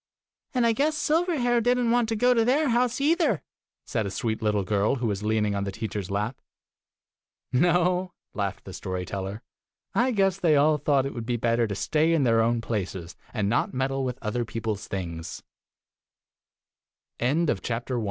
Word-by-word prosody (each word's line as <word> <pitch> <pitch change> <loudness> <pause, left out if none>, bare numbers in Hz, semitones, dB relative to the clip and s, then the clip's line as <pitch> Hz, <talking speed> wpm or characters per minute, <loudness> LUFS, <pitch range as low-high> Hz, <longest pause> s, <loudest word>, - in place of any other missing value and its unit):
" - - -51
"And 245 -2 +3
I 230 - +4
guess 300 +6 +1
Silverhair 300 -8 +2
did 245 +2 +3
n't 240 -2 +1
want 240 -1 +2
to 225 - 0
go 245 +3 +4
to 230 -2 +3
their 275 +5 +2
house 245 +1 +1
either! 295 - +2 0.2
" - - -66
said 110 -3 -1
a - - -2
sweet 110 +3 -2
little 105 -2 +1
girl 105 +5 +1
who 125 -2 -3
was 100 -3 -1
leaning 105 -1 +1
on 100 0 -1
the 100 - -3
teacher's 100 -1 -4
lap. 105 +5 -2 1.1
"No," 180 +5 +2 0.2
laughed 100 -2 -3
the - - -8
story 90 -1 -4
teller. 100 +3 -5 0.5
"I 245 +3 +3
guess 195 -5 +2
they 165 -5 +4
all 150 +1 +4
thought 140 -2 +2
it 135 - -4
would 115 -1 -6
be 120 -1 0
better 115 0 +1
to 100 - -3
stay 155 +10 +2
in 160 -4 +3
their 115 -2 +4
own 115 +1 +1
places, 95 -6 -4 0.2
and 105 -4 -1
not 115 +4 0
meddle 135 +1 0
with 125 -1 -2
other 115 +3 -1
130 Hz, 170 wpm, -26 LUFS, -, 1.1 s, I